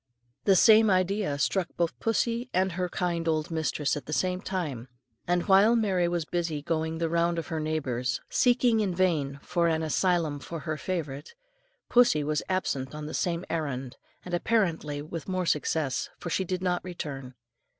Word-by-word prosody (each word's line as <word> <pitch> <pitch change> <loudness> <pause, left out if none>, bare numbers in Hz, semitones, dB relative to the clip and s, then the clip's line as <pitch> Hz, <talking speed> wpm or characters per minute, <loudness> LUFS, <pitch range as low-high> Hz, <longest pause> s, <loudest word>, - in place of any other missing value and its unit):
The 195 - +5
same 220 +2 +7
idea 185 -4 +1
struck 175 +6 +1
both 170 -1 -1
pussy 235 +2 0
and 190 +1 +2
her 180 +1 -2
kind 170 -2 -2
old 155 0 0
mistress 155 -2 0
at 145 - -7
the 155 - -4
same 185 +2 0
time, 150 - -4 0.4
and 175 0 +1
while 200 +4 +6
Mary 190 -6 +2
was 170 -2 -1
busy 165 -4 -2
going 160 0 -1
the 165 0 0
round 170 +1 +1
of 165 - -4
her 160 - -2
neighbours, 140 -6 -1
seeking 245 -2 +3
in 195 -4 0
vain 155 -7 +1
for 175 -1 +1
an 160 -1 +1
asylum 160 -2 +1
for 165 +2 -7
her 155 -2 -3
favourite, 150 - -4 0.5
pussy 240 -12 +4
was 150 +1 0
absent 145 -7 -1
on 150 0 -6
the 155 - -6
same 175 0 -1
errand, 135 -6 -3 0.3
and 180 - -7
apparently 170 -7 0
with 165 +3 -7
more 185 -1 -1
success, 150 -3 0
for 175 - -6
she 190 - 0
did 185 +1 -3
not 180 -1 0
return. 140 -8 -6
170 Hz, 175 wpm, -28 LUFS, 155-185 Hz, 0.5 s, same